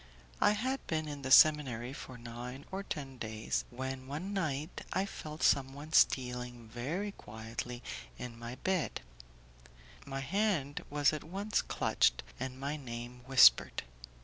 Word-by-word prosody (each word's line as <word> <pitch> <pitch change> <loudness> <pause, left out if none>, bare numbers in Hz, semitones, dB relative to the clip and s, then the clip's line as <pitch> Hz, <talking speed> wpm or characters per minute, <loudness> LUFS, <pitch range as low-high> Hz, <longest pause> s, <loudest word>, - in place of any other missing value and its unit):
I - - +6
had 260 +6 -2
been 155 -1 -1
in 145 -1 -5
the 130 - -4
seminary 130 -4 +6
for 130 -2 -8
nine 120 +3 -7
or 190 +1 -2
ten 135 -9 -6
days, 110 -1 -2
when 130 +1 -5
one 160 +9 -4
night 155 -4 -2
I 190 - +1
felt 155 -5 -7
someone 140 +3 +2
stealing 125 -4 +2
very 155 - -3
quietly 115 - -7 0.3
in 120 -2 -7
my 120 +1 -6
bed; 185 +2 -1 1.0
my 135 -1 -4
hand 175 -4 0
was 145 0 +3
at 155 - -4
once 200 +5 -1
clutched, - - +2 0.2
and 130 +1 -4
my 140 +3 -2
name 120 -2 -7
whispered. 65 - +7
135 Hz, 140 wpm, -33 LUFS, 125-155 Hz, 1.0 s, whispered